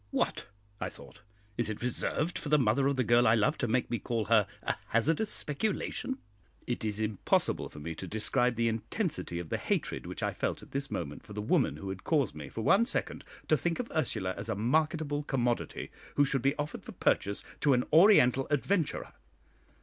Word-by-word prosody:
"What!" - - -1 0.3
I - - -2
thought, - - -10 0.4
"is 120 - +2
it 110 +2 -5
reserved 150 +7 0
for 150 - -6
the 150 - +5
mother 135 +1 +2
of 140 - +1
the 130 - +1
girl 120 +1 +4
I 110 - +6
love 115 +8 +1
to 125 - 0
make 125 +2 0
me 120 - 0
call 115 0 -2
her 110 -3 +4 0.2
'a - - 0
hazardous 160 - +1
speculation'?" 215 - -1 0.5
It 120 -1 -3
is 105 -1 -1
impossible 110 -2 0
for - - -14
me 80 +3 -5
to 95 +4 -7
describe 120 +5 +1
the 115 0 +1
intensity 110 -5 -2
of 85 -2 -5
the - - -1
hatred - - -2
which - - -6
I - - 0
felt - - -2
at - - -15
this 140 0 -2
moment 75 - -5
for 105 - -11
the 105 - -5
woman 140 +4 +2
who 100 - -6
had 95 0 -6
caused 145 - +1
me 75 -3 -8
for 115 - -5
one 200 - +4
second - - -1 0.2
to 155 - +4
think 165 +3 -1
of 245 - -4
Ursula 105 -12 0
as 100 +3 -6
a 110 - 0
marketable 150 +6 +1
commodity, 125 -4 -2 0.2
who 145 - +5
should 135 -2 0
be 135 +3 +2
offered 145 0 -4
for - - -9
purchase 100 +1 +1 0.2
to 145 - +4
an 125 0 +2
Oriental 155 - +6
adventurer. 160 +4 0
125 Hz, 205 wpm, -30 LUFS, 110-150 Hz, 0.5 s, I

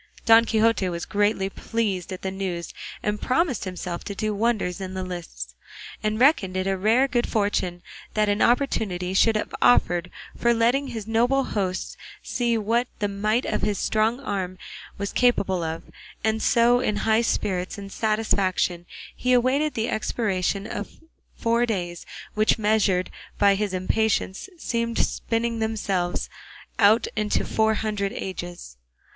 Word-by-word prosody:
Don 225 0 +7
Quixote 220 -3 +2
was 170 -1 -4
greatly 205 -1 +1
pleased 195 -3 -2
at 185 - -6
the 190 - -2
news, 185 -3 -4 0.3
and 210 0 -1
promised 260 - +1
himself 180 -1 -5
to 200 - -5
do 215 +1 -1
wonders 205 -4 0
in 190 0 -5
the 185 - -2
lists, 165 - -7 0.5
and 215 +1 -1
reckoned 225 - +3
it 185 0 -1
rare 220 +8 +3
good 245 -3 0
fortune 195 -5 0 0.3
that 215 -1 +3
an 205 +1 +1
opportunity 210 -8 +1
should 220 +3 +4
have 215 - -2
offered 175 -7 +4 0.3
for 235 0 +2
letting 245 +5 +2
his 220 -5 -5
noble 240 +5 +2
hosts 190 -6 -3 0.3
see 235 -2 0
what 230 +3 +1
the 205 - 0
might 215 +4 0
of - - -1
his 210 -2 0
strong 220 +5 +1
arm 185 -6 -3 0.4
was 200 0 -4
capable 195 -7 +2
of; 160 0 -3 0.4
and 220 0 +1
so 240 +1 +4
in 215 -4 0
high 220 +1 +4
spirits 185 -5 -1
and 200 -1 -8
satisfaction 195 -5 0 0.3
he 250 0 +1
awaited 265 +5 +2
the 225 +1 0
expiration 200 -4 -1
of 205 -1 -5
the - - -24 0.3
four 235 +1 +1
days, 175 -6 -3 0.3
which 215 +1 +3
measured 205 -4 +2 0.3
by 200 -1 +5
his 205 0 -1
impatience 195 - 0
seemed 230 -6 -2
spinning 230 0 0
themselves 200 -5 -1 0.5
out 220 +2 +5
into 210 -1 0
four 220 0 +2
hundred 205 -2 -1
ages. 175 - -6
210 Hz, 150 wpm, -24 LUFS, 185-230 Hz, 0.5 s, Don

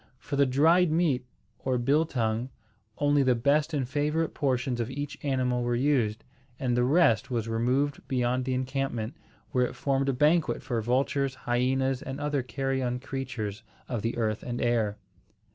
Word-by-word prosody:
For 130 - -5
the 140 -1 +4
dried 165 +7 +4
meat, 150 -7 +1 0.3
or 130 -1 0
biltongue, 120 -3 +1 0.5
only 145 0 +3
the 130 -2 +3
best 145 +6 +2
and 140 -5 -1
favourite 150 +4 0
portions 130 -3 0
of 115 0 -1
each 145 +2 -4
animal 130 -3 0
were 120 0 0
used, 120 -5 +1 0.4
and 125 -2 0
the 120 - +3
rest 125 - +3
was 115 -3 -1
removed 125 +5 0
beyond 125 0 0
the 130 -1 0
encampment, 130 -3 -2 0.4
where 125 -2 +2
it - - -9
formed 135 0 0
a - - +2
banquet 150 +5 +2
for 120 -5 -1
vultures, 135 +3 0
hyenas, 130 +2 +1
and 135 +1 -6
other 145 -1 0
carrion 130 0 -2
creatures 130 -6 -4 0.3
of 120 -4 -3
the 115 +2 -2
earth 110 -2 0
and 120 -1 -4
air. 115 -4 +1
130 Hz, 160 wpm, -28 LUFS, 120-140 Hz, 0.5 s, the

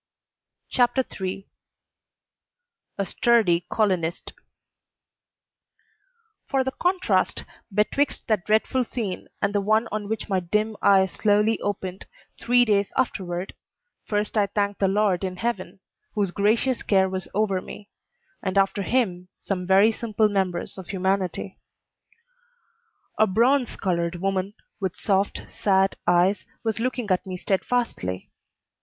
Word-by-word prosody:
CHAPTER 245 +1 +2 0.2
III 190 +1 -4 1.5
A 200 - 0
STURDY 190 -4 +2
COLONIST 180 -6 0 2.2
For 270 -1 +2
the 265 - -2
contrast 365 +5 +1 0.3
betwixt 215 +8 0
that 215 -5 +1
dreadful 220 +4 +2
scene 220 -6 -4 0.2
and 200 +1 +1
the 205 - +2
one 215 +3 +2
on 210 -1 -3
which 220 - -3
my 190 -3 +1
dim 210 +5 -1
eyes 190 -2 +5
slowly 210 +1 +2
opened, 190 -2 -4 0.3
three 245 +1 +4
days 205 -3 +2
afterward, 185 -8 -2 0.5
first 210 +1 -1
I 200 - +3
thank 200 0 -1
the 195 - +3
Lord 195 -2 +1
in 185 -1 -2
heaven, 195 -4 -3 0.3
whose 200 -4 +1
gracious 220 +6 +1
care 190 -2 +3
was 190 0 -4
over 195 -3 +1
me, 205 - -10 0.5
and 190 0 -2
after 195 +1 +2
Him 190 -6 0
some 180 -2 -3
very 195 +4 +6
simple 220 -1 0
members 190 -2 -2
of 185 - -9
humanity. 190 0 -2 1.6
A 220 - +5
bronze 245 +6 +2
colored 170 -2 -1
woman, 195 +2 -2 0.2
with 190 -3 -2
soft, 195 -1 0
sad 195 -1 +1
eyes, 175 +3 +3 0.2
was 225 -1 -1
looking 245 -3 -2
at 185 +1 +1
me 185 -1 -4
steadfastly. 190 - -2
200 Hz, 125 wpm, -24 LUFS, 190-220 Hz, 2.2 s, very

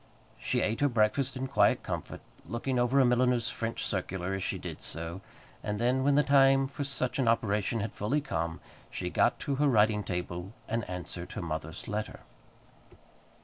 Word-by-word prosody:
She - - 0
ate 110 +4 0
her 145 - +4
breakfast 120 +4 +1
in 130 - -2
quiet 135 - +3
comfort, - - -5 0.3
looking 125 +2 -1
over 125 +3 +3
a 135 - +6
milliner's 125 -1 +2
French 115 0 -3
circular 95 -1 -2
as 95 - -2
she - - -1
did - - -7
so; 85 +4 -5 0.4
and 105 0 -2
then, 125 +4 +2
when 140 0 +4
the 150 - +5
time 135 -1 +5
for 140 +2 -4
such 135 -2 -1
an 130 - +2
operation 110 -1 +1
had 105 +1 -4
fully 120 +9 0
come, 85 - -3 0.3
she - - -4
got - - +2
to 140 -1 -1
her 145 +1 +3
writing 105 -4 +4
table 90 +1 -4
and 115 -2 -2
answered 90 0 -6
her - - -4
mother's 80 0 -5
letter. 105 +1 -4
115 Hz, 180 wpm, -30 LUFS, 95-135 Hz, 0.4 s, a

